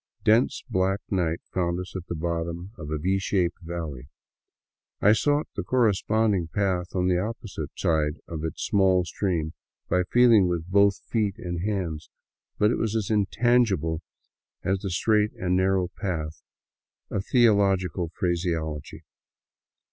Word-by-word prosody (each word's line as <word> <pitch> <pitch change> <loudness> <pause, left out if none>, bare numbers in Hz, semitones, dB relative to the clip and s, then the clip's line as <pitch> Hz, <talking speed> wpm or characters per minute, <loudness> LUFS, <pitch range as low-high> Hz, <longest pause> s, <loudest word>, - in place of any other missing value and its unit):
Dense, 110 +3 +3
black 95 +1 +1
night 85 -4 0
found 85 -1 0
us 90 0 -8
at 90 -2 -6
the 85 - -4
bottom 85 +2 -3
of 75 -8 -8
a 80 - -1
V 95 +5 0
shaped 95 -2 0
valley. 80 -6 -6 0.9
I 105 - +6
sought 145 +7 +1
the - - -2
cor 130 -1 0
responding 105 -3 +2
path 90 0 -1
on 90 -1 +1
the 90 -1 +2
opposite 105 - -5
side 80 -1 +1
of 80 -2 -5
its 80 - -4
small 95 -3 +3
stream 85 -4 -2 0.4
by 90 - +3
feeling 115 -6 +6
with 85 -2 -2
both 100 0 +3
feet 105 -4 0
and 85 -1 -4
hands, 90 -7 -3 0.5
but 105 +2 +3
it - - -1
was 115 -1 -1
as 110 -2 -1
intangible 105 -6 +2 0.6
as 95 +1 0
the 100 - -5
^' - - -5
straight 105 +3 +2
and 90 0 -1
narrow 95 -1 +2
path 80 -6 -4 0.7
"of 100 - -1
theological 100 - +3
phraseology. 85 -4 -2
95 Hz, 150 wpm, -26 LUFS, 85-105 Hz, 0.9 s, I